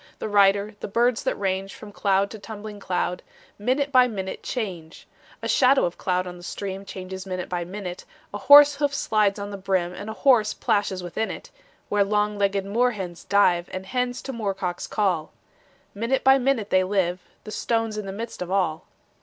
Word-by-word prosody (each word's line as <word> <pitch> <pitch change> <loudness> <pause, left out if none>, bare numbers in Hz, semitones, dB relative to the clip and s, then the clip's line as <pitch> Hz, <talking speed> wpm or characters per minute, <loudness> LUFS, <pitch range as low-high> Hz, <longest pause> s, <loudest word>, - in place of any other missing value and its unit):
The - - -4
rider, 200 0 +3
the - - -5
birds 235 +3 +2
that - - +1
range 195 0 -2
From 210 -2 -11
cloud 200 -1 +1
to 220 - -8
tumbling 210 0 -8
cloud, 180 -1 -2 0.4
Minute 265 +6 0
by 255 -2 +6
minute 190 -5 -5
change; 180 -10 -5 0.4
A - - -1
shadow 270 +1 +4
of 175 - -4
cloud 185 -1 0
on 180 -1 -8
the - - -13
stream 195 +1 -5
Changes 190 0 -7
minute 185 -1 -4
by 175 -1 -2
minute; 185 -1 -7 0.3
A 205 - -4
horse 285 +4 +8
hoof 285 -1 0
slides 210 -6 +1
on 205 0 -5
the 200 - -5
brim, 185 -2 0
And 200 +4 -7
a - - -4
horse 220 -4 +3
plashes 205 -5 0
within 180 +6 -2
it - - -8 0.4
Where 205 -1 +2
long 210 +1 0
legged 200 -1 +1
moor 240 +5 +1
hens 180 -4 -7
dive, 180 -4 +3
And 185 0 -5
hens 250 +3 -2
to 270 - -5
moor 210 -5 -2
cocks 180 -2 -4
call. 180 -7 -1 0.6
Minute 230 +6 -1
by 265 +1 +6
minute 245 -5 0
they 185 0 +4
live: 185 -2 0 0.2
The 215 - -8
stone's 225 -1 -1
in 210 -2 -5
the - - -4
midst 225 +2 -7
of 180 - -4
all. 180 -5 0
200 Hz, 195 wpm, -24 LUFS, 185-225 Hz, 0.6 s, horse